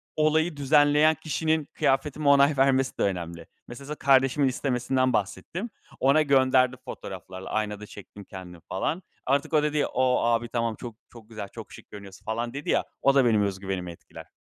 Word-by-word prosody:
olayı 155 Hz, +1 st, +1 dB
düzenleyen 145 Hz, +2 st, +4 dB
kişinin 160 Hz, 0 st, -1 dB
kıyafetime 140 Hz, +2 st, 0 dB
onay 140 Hz, 0 st, +5 dB
vermesi 135 Hz, -1 st, +2 dB
de -, -, 0 dB
önemli. 85 Hz, -3 st, -3 dB, 0.2 s
Mesela, 135 Hz, +3 st, -10 dB
sana 150 Hz, -, -4 dB
kardeşimin 135 Hz, 0 st, +3 dB
istemesinden 130 Hz, 0 st, 0 dB
bahsettim, 170 Hz, -, -3 dB, 0.3 s
ona 140 Hz, +4 st, +4 dB
gönderdim 130 Hz, -2 st, +3 dB
fotoğraflarla, 95 Hz, 0 st, -8 dB
aynada 105 Hz, -1 st, -3 dB
çektim 100 Hz, 0 st, -12 dB
kendimi, 90 Hz, -3 st, -11 dB
falan. 160 Hz, -, -2 dB, 0.2 s
Artık 140 Hz, +4 st, 0 dB
o 150 Hz, -1 st, +4 dB
dedi, 150 Hz, -1 st, +1 dB
"O, 130 Hz, -1 st, +1 dB
abi, 120 Hz, 0 st, +1 dB
tamam, 115 Hz, -2 st, -1 dB
çok, 120 Hz, -2 st, -9 dB
çok 115 Hz, -2 st, -15 dB
güzel, 110 Hz, -3 st, -7 dB
çok -, -, -11 dB
şık -, -, -13 dB
görünüyorsun, 100 Hz, -2 st, -12 dB
falan." 120 Hz, +2 st, -3 dB
dedi 140 Hz, +2 st, -6 dB
ya, -, -, +2 dB, 0.2 s
o 140 Hz, 0 st, +3 dB
da 135 Hz, -2 st, +5 dB
benim 110 Hz, -3 st, +3 dB
öz 95 Hz, -1 st, -2 dB
güvenimi 95 Hz, -3 st, -4 dB
etkiler. 85 Hz, -, -13 dB
130 Hz, 170 wpm, -26 LUFS, 105-145 Hz, 0.3 s, onay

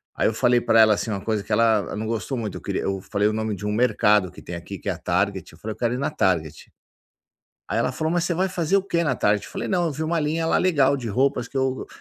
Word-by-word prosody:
Aí -, -, +2 dB
eu 110 Hz, -, 0 dB
falei 120 Hz, +2 st, +3 dB
para 115 Hz, -, +3 dB
ela 110 Hz, -1 st, +6 dB
assim, 110 Hz, -, -3 dB
uma 100 Hz, -, -3 dB
coisa 110 Hz, -3 st, -1 dB
que -, -, -11 dB
ela 110 Hz, -1 st, +2 dB
não 110 Hz, +1 st, -4 dB
gostou 115 Hz, +4 st, -3 dB
muito. 110 Hz, -4 st, -4 dB
Eu -, -, -10 dB
queria -, -, -2 dB
eu 95 Hz, -1 st, -2 dB
falei 100 Hz, +2 st, 0 dB
o 105 Hz, -, 0 dB
nome 110 Hz, -1 st, -2 dB
de 105 Hz, -, -7 dB
um 105 Hz, -, -1 dB
mercado 105 Hz, -5 st, +3 dB
que -, -, -13 dB
tem 85 Hz, -, -7 dB
aqui, 90 Hz, +3 st, -8 dB
que -, -, -4 dB
é -, -, +2 dB
a -, -, -9 dB
Target. 95 Hz, +1 st, -1 dB
Eu 80 Hz, -, -17 dB
falei: 110 Hz, +3 st, -5 dB
"Eu -, -, -20 dB
quero 120 Hz, 0 st, 0 dB
ir -, -, -3 dB
na 140 Hz, -, 0 dB
Target". 80 Hz, -6 st, -1 dB, 1.0 s
Aí -, -, -1 dB
ela 125 Hz, -, 0 dB
falou: 160 Hz, +4 st, -2 dB
"Mas 175 Hz, -1 st, +1 dB
você 175 Hz, -, 0 dB
vai 185 Hz, +3 st, +1 dB
fazer 180 Hz, 0 st, 0 dB
o 195 Hz, -, +2 dB
que 170 Hz, -3 st, 0 dB
na 130 Hz, -, +1 dB
Target?". 105 Hz, 0 st, +1 dB
Eu -, -, -13 dB
falei: -, -, -4 dB
"Não, 180 Hz, -3 st, +1 dB
eu 155 Hz, -, -2 dB
vi 155 Hz, -, -4 dB
uma 165 Hz, +1 st, 0 dB
linha 155 Hz, +2 st, -1 dB
lá -, -, +3 dB
legal 140 Hz, -7 st, +3 dB
de 120 Hz, -4 st, -5 dB
roupas 135 Hz, +6 st, +1 dB
que 135 Hz, -, -9 dB
eu". 130 Hz, 0 st, -1 dB
115 Hz, 300 wpm, -23 LUFS, 105-145 Hz, 1.0 s, ela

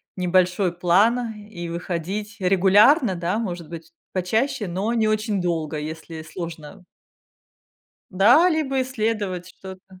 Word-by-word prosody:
небольшой 180 Hz, 0 st, +1 dB
план 220 Hz, +7 st, +2 dB
и 205 Hz, -5 st, -8 dB
выходить 185 Hz, +5 st, -4 dB
регулярно, 195 Hz, -, +4 dB
да, 175 Hz, +4 st, -2 dB
может 175 Hz, -7 st, -5 dB
быть 165 Hz, -1 st, -9 dB, 0.2 s
почаще, 220 Hz, +5 st, -1 dB
но 190 Hz, +6 st, -2 dB
не 220 Hz, -1 st, +2 dB
очень 215 Hz, -2 st, 0 dB
долго, 160 Hz, -3 st, -2 dB
если 160 Hz, +1 st, -7 dB
сложно. 165 Hz, +1 st, -9 dB, 1.3 s
Да, 235 Hz, -, +5 dB
либо 275 Hz, -4 st, 0 dB
исследовать 215 Hz, -7 st, -2 dB
что-то. 190 Hz, 0 st, -13 dB
190 Hz, 115 wpm, -23 LUFS, 175-215 Hz, 1.3 s, Да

